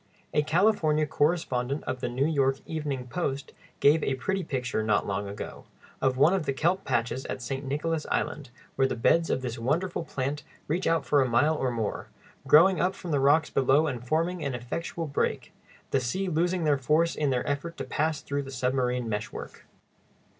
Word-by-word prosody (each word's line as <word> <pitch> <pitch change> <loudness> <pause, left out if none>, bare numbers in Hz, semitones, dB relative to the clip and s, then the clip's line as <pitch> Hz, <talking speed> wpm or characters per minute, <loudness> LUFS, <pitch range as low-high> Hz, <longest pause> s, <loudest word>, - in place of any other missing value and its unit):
A 150 - +4
California 155 -2 +2
correspondent 145 -3 0
of 130 - -3
the 125 - -2
New 130 +3 0
York 135 -4 +2
"Evening 145 -5 -3
Post" 140 0 -3 0.3
gave 150 +2 +5
a 135 - 0
pretty 190 +8 -2
picture, 125 -7 -2
not 110 -1 +1
long 100 0 -2
ago, 100 +1 -7 0.4
of 130 -1 +2
one 155 +7 +5
of 185 -5 -1
the 135 - +1
kelp 175 +7 +1
patches 120 +1 -1
at - - -4
St. 135 +3 -4
Nicholas 150 +3 -2
Island, 145 -4 -2 0.3
where 135 0 +3
the - - -2
beds 165 +8 +3
of 130 - 0
this 120 -1 -4
wonderful 165 +9 -1
plant 145 -1 -3 0.3
reach 170 +5 0
out 165 -4 +2
for 145 +3 +3
a 130 - +1
mile 145 +7 +3
or 130 -4 0
more, 115 -4 -3 0.4
growing 175 +5 +6
up 185 +2 +1
from 175 -4 -6
the 145 - +2
rocks 145 +4 +3
below 135 +4 +3
and 125 -6 -3
forming 165 +6 0
an 140 -3 -2
effectual 165 +7 -4
break; 140 -2 -2 0.4
the 135 - +3
seas 180 +10 -2
losing 175 +2 +1
their 145 -3 +2
force 155 +6 +2
in 150 -2 0
their 125 +1 -1
effort 150 +4 -3
to - - -3
pass 155 0 -1
through 140 0 -2
the 135 - -8
submarine 125 -1 0
meshwork. 105 -1 -6
145 Hz, 190 wpm, -27 LUFS, 130-160 Hz, 0.4 s, growing